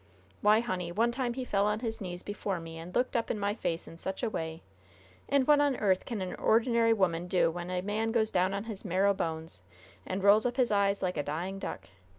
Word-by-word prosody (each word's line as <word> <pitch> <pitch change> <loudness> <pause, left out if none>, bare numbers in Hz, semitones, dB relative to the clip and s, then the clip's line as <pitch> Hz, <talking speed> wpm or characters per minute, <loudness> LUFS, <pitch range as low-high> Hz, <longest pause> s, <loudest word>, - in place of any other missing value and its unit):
Why, 210 +2 +5
honey, 180 -7 -3
one 230 +6 +2
time 240 -1 -2
he 260 -1 -3
fell 200 -3 +1
on 210 +1 0
his 225 -1 -3
knees 180 -2 -5
before 205 -2 -3
me 165 0 -8
and 170 +2 -9
looked 250 +2 +1
up 230 - 0
in 225 - -1
my 205 0 0
face 170 -6 -3
in 165 - -11
such 190 +7 -4
a 230 - 0
way! 160 -2 -4 0.7
And 275 -1 +3
what 295 0 +5
on 285 -2 +2
earth 190 -5 +1
can 220 -5 -3
an 185 - -4
ordinary 230 0 +3
'oman 180 -5 +1
do 180 -2 +2
when 175 +1 -6
a 180 0 -1
man 215 +3 -1
goes 220 -2 +1
down 185 +1 +2
on 200 - -3
his 220 -3 -6
marrow 195 +1 +2
bones 160 - -4 0.4
and 185 - -4
rolls 210 +3 +6
up 245 +1 -4
his 250 -4 +2
eyes 200 -1 +2
like 180 -2 -1
a - - +1
dying 175 +7 -4
duck? - - -6
200 Hz, 235 wpm, -30 LUFS, 180-225 Hz, 0.7 s, rolls